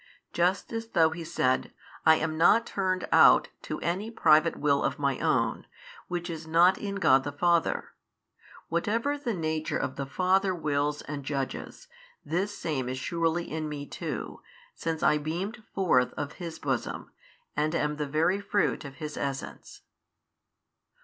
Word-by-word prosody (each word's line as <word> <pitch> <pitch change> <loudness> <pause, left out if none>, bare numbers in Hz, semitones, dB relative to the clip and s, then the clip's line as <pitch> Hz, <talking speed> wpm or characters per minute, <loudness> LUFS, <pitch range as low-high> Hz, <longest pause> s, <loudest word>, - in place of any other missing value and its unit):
Just 180 +6 +1
as 225 0 -3
though 165 -7 +3
He 165 +1 -6
said, 130 -5 0 0.4
I 160 - +8
am 155 0 -2
not 210 +8 +5
turned 185 -2 -1
out - - +6
to - - -5
any 190 +6 -2
private 165 -7 +4
will 140 -1 +2
of - - -1
My 140 -2 0
own, - - 0 0.4
which 175 0 -3
is 165 -2 -6
not 170 +3 +5
in 200 -1 -4
God 135 -9 +4
the 145 - -4
Father. 170 +3 +1 0.8
Whatever 225 - 0
the 250 -7 -3
Nature 155 -2 -2
of 130 - -3
the 140 -1 -3
Father 185 +5 +2
wills 150 -2 -1
and 145 -1 -6
judges, 135 -1 -4 0.4
this 195 +5 -2
same 130 -6 -2
is 130 - -3
surely 170 +4 -1
in 155 0 -3
Me 145 -1 -5
too, - - -6 0.3
since 160 -1 -3
I 150 0 +4
beamed 185 +10 -4
forth 150 -10 +3
of 145 -1 -5
His 165 -2 -5
Bosom, 135 -6 -3 0.4
and 155 +2 0
am 150 -2 0
the 150 -1 -2
Very 165 +7 +1
Fruit 205 -2 0
of 140 -2 -9
His 150 0 -6
Essence. 140 -1 -5
160 Hz, 155 wpm, -28 LUFS, 145-185 Hz, 0.8 s, I